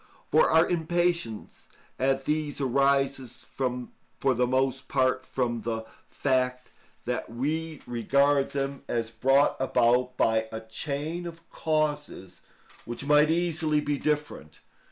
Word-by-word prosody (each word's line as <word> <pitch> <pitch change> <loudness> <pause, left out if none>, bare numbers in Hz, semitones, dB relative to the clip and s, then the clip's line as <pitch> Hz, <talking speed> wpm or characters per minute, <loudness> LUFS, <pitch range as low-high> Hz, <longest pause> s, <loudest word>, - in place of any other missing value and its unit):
For - - +5
our 160 +1 +5
impatience 170 -8 -1 0.3
at 135 +1 +1
these 150 -1 -1
arises 135 -1 +1
for 125 +1 -2
the 125 0 +1
most 130 +1 0
part 130 -1 +1
from 120 -3 -2
the 115 0 -3 0.2
fact 125 -2 0 0.3
that - - -2
we 155 +6 -3
regard 140 +4 +2
them 140 0 -3
as 115 -1 -2
brought 135 +5 +3
about 125 -1 +2
by 110 0 +2
a 110 0 -5
chain 145 +9 -4
of 165 0 -11
causes 150 - -2 0.4
which 120 +3 -6
might 150 +1 +5
easily 160 -2 +1
be 145 -1 -1
different. 150 - -3
135 Hz, 120 wpm, -27 LUFS, 125-150 Hz, 0.4 s, For